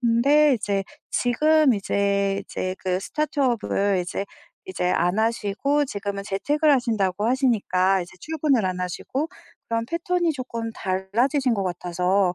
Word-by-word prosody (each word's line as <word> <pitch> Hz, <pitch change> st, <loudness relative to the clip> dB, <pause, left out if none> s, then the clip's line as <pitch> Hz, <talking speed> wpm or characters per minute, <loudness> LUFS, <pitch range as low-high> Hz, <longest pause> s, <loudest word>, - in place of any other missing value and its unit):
근데 270 Hz, +5 st, +4 dB
이제 200 Hz, -3 st, -1 dB, 0.3 s
지금 300 Hz, +2 st, +3 dB
이제, 200 Hz, 0 st, 0 dB
이제 185 Hz, 0 st, -4 dB
그 185 Hz, -1 st, 0 dB
스타트업을 240 Hz, -7 st, 0 dB
이제 180 Hz, +3 st, -4 dB, 0.4 s
이제 375 Hz, -, -2 dB
안 180 Hz, +2 st, +1 dB
하시고 230 Hz, +6 st, +1 dB
지금은 200 Hz, -4 st, -4 dB
재택을 295 Hz, +10 st, +1 dB
하신다고 215 Hz, -6 st, +1 dB
하시니까 200 Hz, -7 st, +2 dB
이제 175 Hz, -, -12 dB
출근을 300 Hz, -, +1 dB
안 180 Hz, -1 st, -3 dB
하시고 255 Hz, -, -3 dB, 0.4 s
그런 230 Hz, 0 st, -1 dB
패턴이 340 Hz, +3 st, 0 dB
조끔 235 Hz, -4 st, -5 dB
달라지신 230 Hz, +8 st, 0 dB
것 200 Hz, -, -1 dB
같아서 180 Hz, +1 st, 0 dB
220 Hz, 300 characters per minute, -24 LUFS, 195-275 Hz, 0.4 s, 근데